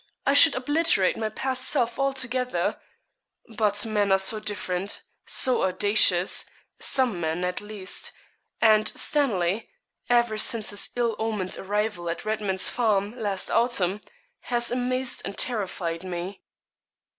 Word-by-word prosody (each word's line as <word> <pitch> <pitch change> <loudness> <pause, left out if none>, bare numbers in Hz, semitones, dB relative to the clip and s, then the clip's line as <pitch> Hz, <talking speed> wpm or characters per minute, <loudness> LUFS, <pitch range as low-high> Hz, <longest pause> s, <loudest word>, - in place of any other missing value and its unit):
I 275 - +3
should 295 +2 +7
obliterate 290 - +2
my 220 -1 -3
past 260 +3 -3
self 240 -1 -1
altogether; 260 -2 -1 0.7
but 205 -1 +1
men 210 -2 0
are 195 - +5
so 190 +3 +4
different, 200 -2 -3 0.2
so 255 -1 +2
audacious 190 -1 +3 0.3
some 250 -9 +2
men, 165 +2 -2
at 180 0 -2
least 205 -2 -3 0.5
and 215 -1 +4
Stanley, 215 - 0 0.4
ever 235 -3 +2
since 220 -1 +4
his 205 - 0
ill 235 -2 -1
omened 215 -4 -3
arrival 205 -3 -3
at 170 - -5
Redman's 210 -3 0
Farm, 215 -2 0
last 205 -5 -3
autumn, 210 -5 0 0.4
has 240 -1 -1
amazed 255 +1 -2
and 195 - -7
terrified 185 -7 -1
me.' 185 +1 -6
215 Hz, 125 wpm, -25 LUFS, 190-245 Hz, 0.7 s, should